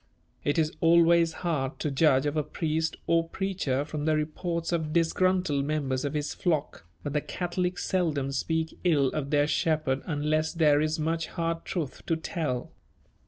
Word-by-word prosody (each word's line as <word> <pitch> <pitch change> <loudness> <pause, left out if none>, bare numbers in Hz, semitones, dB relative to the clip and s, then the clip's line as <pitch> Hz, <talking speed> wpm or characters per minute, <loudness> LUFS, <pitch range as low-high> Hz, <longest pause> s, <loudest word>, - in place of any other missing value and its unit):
It 145 - 0
is 155 -1 +2
always 170 0 +5
hard 145 -5 -1
to 150 - -2
judge 135 -1 +3
of 145 +1 -1
a 155 - +2
priest 160 +1 -2
or 165 0 +2
preacher 175 -9 -1
from 150 -1 -4
the 155 -1 +3
reports 165 +3 -2
of 160 -3 -1
disgruntled 170 -3 +2
members 140 -3 -1
of 145 - -3
his 150 0 -2
flock, 150 - -2 0.2
but 145 - -3
the 150 - +1
Catholics 180 +2 -2
seldom 155 -7 0
speak 160 +4 -2
ill 145 -7 +3
of 140 -1 -3
their 145 0 +3
shepherd 155 -3 0
unless 155 0 0
there 150 -3 +4
is 155 0 0
much 165 +1 -1
hard 165 0 -3
truth 160 -8 -4
to 165 - +2
tell. 160 -6 -3
155 Hz, 165 wpm, -28 LUFS, 145-165 Hz, 0.2 s, always